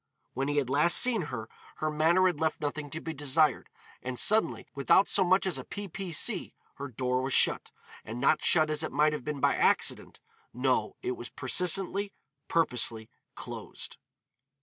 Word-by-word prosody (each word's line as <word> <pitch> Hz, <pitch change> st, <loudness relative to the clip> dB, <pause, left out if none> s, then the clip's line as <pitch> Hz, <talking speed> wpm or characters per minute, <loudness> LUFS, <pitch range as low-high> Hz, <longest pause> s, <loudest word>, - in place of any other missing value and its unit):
When 135 Hz, +2 st, -2 dB
he 145 Hz, 0 st, -1 dB
had 140 Hz, -4 st, +1 dB
last 150 Hz, +6 st, +4 dB
seen 230 Hz, -9 st, +4 dB
her, 115 Hz, -4 st, -6 dB, 0.3 s
her 155 Hz, 0 st, -2 dB
manner 165 Hz, +5 st, +3 dB
had 175 Hz, -5 st, +1 dB
left 160 Hz, -1 st, -1 dB
nothing 145 Hz, -1 st, -4 dB
to 160 Hz, -, -6 dB
be 160 Hz, 0 st, -6 dB
desired, 145 Hz, 0 st, +1 dB, 0.3 s
and 125 Hz, 0 st, -5 dB
suddenly, 220 Hz, +1 st, +3 dB
without 140 Hz, +8 st, +3 dB
so 195 Hz, -, +2 dB
much 185 Hz, +2 st, +2 dB
as 190 Hz, -, -2 dB
a -, -, -7 dB
p. 205 Hz, 0 st, -7 dB
p. 190 Hz, 0 st, -7 dB
c., 155 Hz, -, 0 dB, 0.2 s
her 140 Hz, -, -5 dB
door 125 Hz, 0 st, -2 dB
was 135 Hz, 0 st, -3 dB
shut, -, -, +3 dB, 0.3 s
and 115 Hz, +2 st, -7 dB
not 140 Hz, -, +2 dB
shut 155 Hz, -2 st, +3 dB
as 155 Hz, 0 st, -1 dB
it 160 Hz, -, -3 dB
might 150 Hz, +2 st, +2 dB
have 150 Hz, -, -5 dB
been 150 Hz, 0 st, -4 dB
by -, -, +2 dB
accident; -, -, 0 dB, 0.4 s
no, 130 Hz, +1 st, 0 dB
it -, -, -1 dB
was 120 Hz, -1 st, -7 dB
persistently, 190 Hz, -, -1 dB, 0.3 s
purposely 120 Hz, -8 st, 0 dB, 0.2 s
closed. -, -, -7 dB
150 Hz, 180 wpm, -29 LUFS, 130-175 Hz, 0.4 s, last